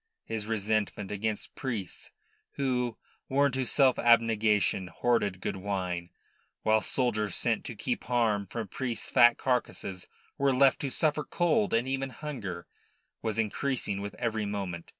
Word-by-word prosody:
His 110 Hz, -2 st, -4 dB
resentment 110 Hz, -2 st, -1 dB
against 105 Hz, +1 st, -3 dB
priests 115 Hz, -9 st, -5 dB, 0.4 s
who, 125 Hz, -4 st, -1 dB, 0.3 s
sworn 140 Hz, +1 st, +3 dB
to 130 Hz, +1 st, 0 dB
self 130 Hz, +1 st, +3 dB
abnegation, 110 Hz, -5 st, +3 dB
hoarded 100 Hz, 0 st, 0 dB
good 95 Hz, -, -3 dB
wine, 90 Hz, -3 st, -3 dB, 0.5 s
whilst 110 Hz, 0 st, +2 dB
soldiers 110 Hz, -6 st, 0 dB
sent -, -, 0 dB
to -, -, -6 dB
keep -, -, -3 dB
harm 110 Hz, -5 st, +1 dB
from 115 Hz, +2 st, -4 dB
priests' 120 Hz, +3 st, -4 dB
fat 120 Hz, 0 st, +7 dB
carcasses 110 Hz, -7 st, -2 dB, 0.3 s
were 135 Hz, -1 st, +3 dB
left 135 Hz, 0 st, +5 dB
to 140 Hz, -, -1 dB
suffer 150 Hz, +3 st, +1 dB
cold 200 Hz, +7 st, +1 dB
and 120 Hz, +3 st, +1 dB
even 135 Hz, 0 st, -1 dB
hunger, 115 Hz, -, -6 dB, 0.6 s
was 110 Hz, -1 st, -2 dB
increasing 115 Hz, -2 st, -1 dB
with 100 Hz, 0 st, -6 dB
every 110 Hz, -3 st, -1 dB
moment. 95 Hz, -5 st, -4 dB
115 Hz, 140 wpm, -29 LUFS, 100-130 Hz, 0.6 s, fat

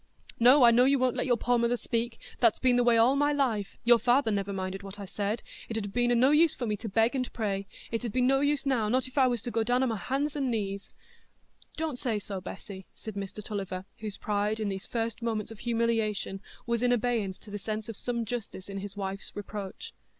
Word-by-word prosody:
"No, 255 Hz, +4 st, +7 dB
I 235 Hz, -, +8 dB
know 245 Hz, +2 st, +5 dB
you 275 Hz, +1 st, +4 dB
won't 255 Hz, -1 st, +1 dB
let -, -, -1 dB
your 245 Hz, -2 st, +3 dB
poor 245 Hz, +1 st, +2 dB
mother 235 Hz, +1 st, +2 dB
speak—that's 235 Hz, 0 st, 0 dB
been 255 Hz, -1 st, +3 dB
the 245 Hz, -, +4 dB
way 240 Hz, -1 st, +5 dB
all 240 Hz, +4 st, +5 dB
my 290 Hz, +1 st, +3 dB
life—your 240 Hz, -3 st, +2 dB
father 245 Hz, +1 st, +3 dB
never 200 Hz, -1 st, -1 dB
minded 190 Hz, 0 st, -3 dB
what 200 Hz, +1 st, -9 dB
I 200 Hz, -, -5 dB
said—it 210 Hz, +3 st, -4 dB
'ud 215 Hz, -, -2 dB
have 200 Hz, -, -7 dB
been 245 Hz, 0 st, +2 dB
o' -, -, +4 dB
no 255 Hz, +4 st, +5 dB
use 315 Hz, +1 st, +5 dB
for 245 Hz, -, -3 dB
me 210 Hz, -2 st, 0 dB
to 220 Hz, +2 st, -6 dB
beg 225 Hz, +5 st, +3 dB
and 255 Hz, -2 st, -2 dB
pray—and 200 Hz, -3 st, -2 dB, 0.3 s
it 230 Hz, +1 st, -2 dB
'ud 235 Hz, -, -2 dB
be 255 Hz, -, 0 dB
no 270 Hz, +2 st, +4 dB
use 285 Hz, 0 st, +1 dB
now, 240 Hz, -6 st, +1 dB
not 255 Hz, +3 st, +1 dB
if 255 Hz, -, -14 dB
I 260 Hz, -, +6 dB
was 240 Hz, -4 st, -1 dB
to 240 Hz, -, -3 dB
go 225 Hz, 0 st, +1 dB
down 245 Hz, +3 st, +2 dB
o' -, -, +3 dB
my 225 Hz, -3 st, -1 dB
hands 275 Hz, +7 st, -1 dB
and 275 Hz, -3 st, 0 dB
knees——" 200 Hz, -4 st, -3 dB, 0.9 s
"Don't 310 Hz, -5 st, -2 dB
say 230 Hz, -4 st, 0 dB
so, 200 Hz, -2 st, -5 dB
Bessy," 190 Hz, 0 st, -9 dB
said 220 Hz, -, -8 dB
Mr 200 Hz, +1 st, -6 dB
Tulliver, 190 Hz, -3 st, -4 dB
whose 210 Hz, -3 st, -5 dB
pride, 210 Hz, +1 st, -1 dB
in 215 Hz, -2 st, -1 dB
these 195 Hz, 0 st, -5 dB
first 230 Hz, 0 st, -2 dB
moments 225 Hz, -2 st, -2 dB
of 220 Hz, -, -10 dB
humiliation, 225 Hz, -4 st, 0 dB, 0.2 s
was 235 Hz, -1 st, 0 dB
in 245 Hz, 0 st, +3 dB
abeyance 225 Hz, -5 st, 0 dB
to 210 Hz, -, -14 dB
the 205 Hz, -, -4 dB
sense 215 Hz, +1 st, -4 dB
of 225 Hz, -, -6 dB
some 235 Hz, +2 st, -2 dB
justice 220 Hz, -4 st, -5 dB
in 195 Hz, 0 st, -4 dB
his 200 Hz, +1 st, -7 dB
wife's 195 Hz, 0 st, -4 dB
reproach. 205 Hz, -1 st, -6 dB
230 Hz, 240 wpm, -29 LUFS, 205-245 Hz, 0.9 s, I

